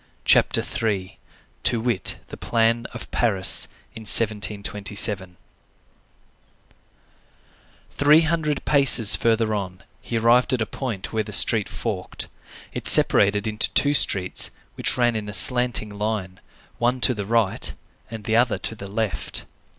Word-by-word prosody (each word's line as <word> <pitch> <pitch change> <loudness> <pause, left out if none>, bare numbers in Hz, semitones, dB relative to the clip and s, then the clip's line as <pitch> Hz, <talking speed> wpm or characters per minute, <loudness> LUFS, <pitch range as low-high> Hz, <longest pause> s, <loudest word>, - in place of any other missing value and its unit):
CHAPTER - - +3
III—TO 110 +2 -4
WIT, 115 -4 -1
THE - - -9
PLAN 115 0 -1
OF 120 - -11
PARIS 95 -6 +2 0.3
IN 115 - -11
1727 105 -3 0 2.5
Three 150 +3 +3
hundred 160 -3 -3
paces 135 -7 +5
further 115 -1 -1
on, 95 -2 -6 0.2
he 115 - -5
arrived 120 +3 +2
at 125 - -2
a - - -6
point 115 -8 -7
where 110 - -1
the 105 0 -9
street 105 +1 +5
forked. 90 +1 -6 0.5
It - - -2
separated 100 +1 +4
into 105 -1 0
two 145 0 +2
streets, 95 -9 +3 0.2
which - - -3
ran 120 -2 0
in 105 -1 -6
a - - -8
slanting 125 0 +2
line, 100 -3 -5 0.4
one 125 +2 -1
to 125 - +4
the 100 -3 -6
right, 115 -3 -1 0.4
and 110 -2 -9
the 110 +2 -2
other 120 -1 +1
to - - -4
the 100 -3 -10
left. 105 -1 -5
110 Hz, 135 wpm, -21 LUFS, 100-120 Hz, 2.5 s, paces